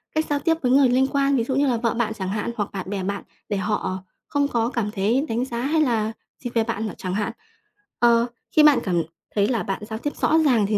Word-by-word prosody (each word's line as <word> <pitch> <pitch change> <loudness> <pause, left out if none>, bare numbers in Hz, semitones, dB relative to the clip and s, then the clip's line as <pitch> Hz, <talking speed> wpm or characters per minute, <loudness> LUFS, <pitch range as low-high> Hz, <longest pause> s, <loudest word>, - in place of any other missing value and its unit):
cách 315 0 +2
giao 290 -1 +1
tiếp 325 +2 +1
với 250 - +1
người 270 -1 +6
liên 260 +2 +3
quan, 275 0 +2
ví 235 - +2
dụ 260 +2 -2
như 280 +1 +3
là 245 -3 +2
vợ 230 0 0
bạn 230 -2 -1
chẳng 190 -4 -4
hạn, 210 +3 -2
hoặc 205 -2 -1
bạn 190 -1 -5
bè 195 -2 -2
bạn 200 +2 -3 0.3
để 205 - 0
họ 190 -2 -2 0.2
không 285 -1 +1
có 235 -4 0
cảm 230 -5 -2
thấy 220 +8 +1
đánh 235 +3 0
giá 235 -2 -4
hay 310 +5 +2
là 225 -6 +1 0.3
gì 245 - -2
về 230 - +3
bạn 220 -1 -2
n - - -4
chẳng 185 -1 -4
hạn. 210 +3 -1 0.7
Ờ, 235 -1 +5 0.3
khi 305 - +5
bạn 300 -3 +7
cảm 175 -4 +1 0.3
thấy 205 -1 +3
là 230 -5 0
bạn 195 +2 -3
giao 220 0 -4
tiếp 290 +4 -3
rõ 320 - +4
ràng 235 -7 +4
thì 210 0 +1
230 Hz, 260 wpm, -23 LUFS, 205-265 Hz, 0.7 s, bạn